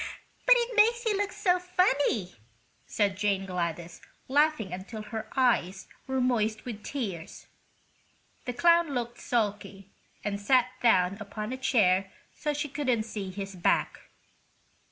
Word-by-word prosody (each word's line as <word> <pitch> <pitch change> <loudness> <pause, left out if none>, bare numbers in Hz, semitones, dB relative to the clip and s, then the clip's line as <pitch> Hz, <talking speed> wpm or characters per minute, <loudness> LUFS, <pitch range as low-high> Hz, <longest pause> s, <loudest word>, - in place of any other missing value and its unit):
"But - - +9
it 475 0 -1
makes 470 +2 +4
you 435 -2 +2
look 405 0 -1
so 370 -3 +1
funny!" 290 - +1 0.5
said 200 -2 0
Jane 200 -1 0
Gladys, 170 -2 -4 0.3
laughing 285 - +2
until 200 +4 -7
her 220 0 -6
eyes 210 -8 +1 0.2
were 265 0 -1
moist 225 -4 0
with 220 -4 -7
tears. 195 - -5 1.0
The 245 - -3
clown 335 +1 +3
looked 240 -1 -3
sulky 205 -4 -2 0.3
and 200 -1 -3
sat 250 +3 +3
down 190 -5 +3
upon 210 +3 -5
a - - -4
chair 195 -7 +2 0.2
so 300 - -2
she 295 0 -2
couldn't 260 -6 0
see 210 -3 -5
his 195 +1 -6
back. 175 - +1
225 Hz, 135 wpm, -28 LUFS, 195-285 Hz, 1.0 s, But